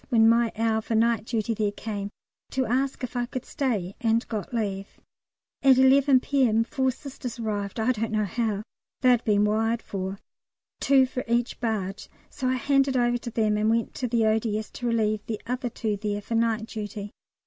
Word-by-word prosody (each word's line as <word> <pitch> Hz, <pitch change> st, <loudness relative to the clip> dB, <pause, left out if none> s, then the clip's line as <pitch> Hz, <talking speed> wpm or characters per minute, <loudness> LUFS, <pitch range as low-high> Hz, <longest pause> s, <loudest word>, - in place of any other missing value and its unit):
when 225 Hz, -3 st, +5 dB
my 230 Hz, 0 st, +4 dB
hour 220 Hz, 0 st, +1 dB
for 225 Hz, +1 st, -2 dB
night 230 Hz, 0 st, +2 dB
duty 225 Hz, -1 st, -1 dB
there 210 Hz, -1 st, 0 dB
came, 205 Hz, -1 st, -5 dB, 0.4 s
to 260 Hz, -1 st, 0 dB
ask 265 Hz, +3 st, -1 dB
if 250 Hz, 0 st, -5 dB
I 240 Hz, 0 st, -1 dB
could 255 Hz, 0 st, -5 dB
stay, 210 Hz, -9 st, -2 dB
and 230 Hz, 0 st, +1 dB
got 215 Hz, -3 st, -4 dB
leave. 200 Hz, -4 st, -3 dB, 0.6 s
At 270 Hz, -2 st, +6 dB
11 265 Hz, 0 st, +5 dB
P.M. 245 Hz, -6 st, +2 dB
four 260 Hz, +3 st, 0 dB
Sisters 255 Hz, -2 st, -6 dB
arrived 205 Hz, -2 st, -3 dB
(I 220 Hz, +3 st, +2 dB
don't 225 Hz, -2 st, -2 dB
know 215 Hz, -1 st, +1 dB
how 215 Hz, 0 st, -1 dB, 0.4 s
they'd 250 Hz, -2 st, +4 dB
been 210 Hz, -2 st, +3 dB
wired 225 Hz, +2 st, +1 dB
for), 190 Hz, 0 st, -4 dB, 0.6 s
two 270 Hz, -1 st, +5 dB
for 255 Hz, 0 st, -4 dB
each 235 Hz, +1 st, 0 dB
barge; 205 Hz, -5 st, -3 dB, 0.2 s
so 255 Hz, -, -3 dB
I 255 Hz, -, +2 dB
handed 275 Hz, +1 st, +2 dB
over 240 Hz, 0 st, +2 dB
to 235 Hz, -, -6 dB
them 215 Hz, -2 st, +1 dB
and 215 Hz, +1 st, +2 dB
went 230 Hz, 0 st, 0 dB
to 250 Hz, -, -2 dB
the 230 Hz, -1 st, +2 dB
O.D.S. 220 Hz, 0 st, 0 dB
to 245 Hz, -, -4 dB
relieve 215 Hz, -2 st, +1 dB
the 220 Hz, -2 st, -3 dB
other 250 Hz, +1 st, -2 dB
two 220 Hz, -3 st, -2 dB
there 205 Hz, 0 st, -2 dB
for 230 Hz, -, -5 dB
night 225 Hz, -1 st, +1 dB
duty. 210 Hz, -2 st, -6 dB
230 Hz, 190 wpm, -26 LUFS, 215-250 Hz, 0.6 s, At